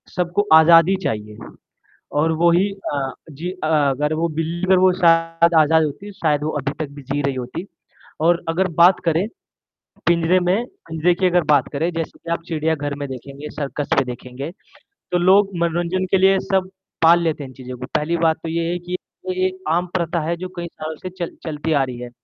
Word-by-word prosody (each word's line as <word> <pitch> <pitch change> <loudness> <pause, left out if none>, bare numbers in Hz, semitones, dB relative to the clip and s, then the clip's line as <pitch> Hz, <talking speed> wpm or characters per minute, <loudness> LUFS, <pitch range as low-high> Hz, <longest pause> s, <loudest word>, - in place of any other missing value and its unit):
सबको 180 +3 0
आज़ादी 165 +3 +7
चाहिए 105 -1 -3 0.8
और 160 +2 +2
वो 170 0 +5
ही 185 +4 +3 0.2
अ, 135 -2 -2 0.2
जी 165 +6 -5
अ, 185 -4 -4
अगर 150 -1 +1
वो 165 +2 0
बिल्ली 170 +3 -1
और 185 - +5
वो 185 0 +5
शायद 165 -1 +3
आज़ाद 160 +1 +4
होती 175 +8 -5
तो 195 - -19
शायद 150 -2 +1
वो 155 - -1
अभी 140 - -2
तक 155 -3 -3
भी 145 - -9
जी 140 +2 -2
रही 140 -1 -1
होती। 130 +8 -5 0.6
और 170 +2 +3
अगर 185 +3 +1
बात 175 +2 +7
करें 165 +3 +1 0.8
पिंजरे 170 +1 +3
में 185 +6 +1 0.2
पिंजरे 160 +2 +2
की 185 +1 +1
अगर 180 -1 +3
बात 145 -4 +3
करें 160 +4 0
जैसे 165 -1 -5
कि 165 - -9
आप 170 - -2
चिड़ियाघर 155 -3 -1
में 145 -1 -4
देखेंगे, 140 +3 -8
सर्कस 145 0 -4
में 135 - +3
देखेंगे 125 +4 -7 0.6
तो 180 - +2
लोग 195 +3 +4
मनोरंजन 170 +2 0
के 195 - +5
लिए 190 +1 +4
सब 190 -1 -1 0.3
पाल 170 +1 +6
लेते 155 -3 -1
हैं 135 - -8
इन - - -14
चीज़ों 130 -1 -8
को। 125 - -6
पहली 155 +3 +1
बात 160 -1 +2
तो 165 - -4
ये 165 +1 -1
है 175 - -1
कि 175 +1 -5 0.3
ये 185 0 0
एक 185 0 -7
आम 175 +3 +1
प्रथा 170 -1 0
है 170 - 0
जो 185 +1 -6
कई 175 0 -4
सालों 155 -1 -7
से 185 - -7
चल 180 -2 -6
चलती 160 0 -3
आ 140 -2 +3
रही 130 -2 -5
है। 125 0 -7
165 Hz, 210 wpm, -21 LUFS, 150-175 Hz, 0.8 s, आज़ादी